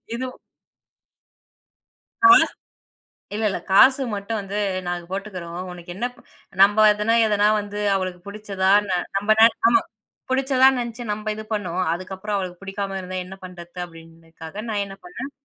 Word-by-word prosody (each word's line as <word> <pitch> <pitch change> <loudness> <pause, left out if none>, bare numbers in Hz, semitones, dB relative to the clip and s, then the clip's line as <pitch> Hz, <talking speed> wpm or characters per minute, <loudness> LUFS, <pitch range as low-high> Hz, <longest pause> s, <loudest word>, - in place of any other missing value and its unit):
இதும் 255 +1 -5 1.9
ஆ, - - +10 1.1
இல்ல, 220 - -2
இல்ல. 195 - -2
காசு 260 +7 +6
மட்டும் 205 +2 -3
வந்து 200 +1 -5 0.3
நாங்க 175 -1 -3
போட்டுக்குறோம், 185 -4 -6
உனக்கு 175 -1 -10
என்னப் 245 +6 -4 0.4
நம்ப 205 +2 +5
அதுனா, 210 +2 0
எதுனா 210 -1 +3
வந்து 205 0 -7 0.2
அவளுக்கு 185 -2 -3
புடிச்சதா, 200 -2 -2 0.2
ந - - -4 0.3
நம்ப 205 +2 -1
நா 225 - +10 0.2
ஆமா 230 0 +5 0.5
பிடிச்சதான் 265 0 +4
நெனச்சு 235 0 -5
நம்ப 210 +1 -6
இது 215 - -7
பண்ணோம். 185 -3 -2
அதுக்கப்புறம் 190 +3 -5
அவளுக்கு 180 -2 -5
பிடிக்காம 195 0 -4
இருந்தா 185 0 -6
என்ன 190 - -9
பண்றது 180 -1 -10
அப்பிடின்றதுக்காக 165 +2 -11
நான் 205 -1 0
என்ன 195 - -9
பண்ணேன் 290 -6 -7
200 Hz, 140 wpm, -22 LUFS, 185-215 Hz, 1.9 s, ஆ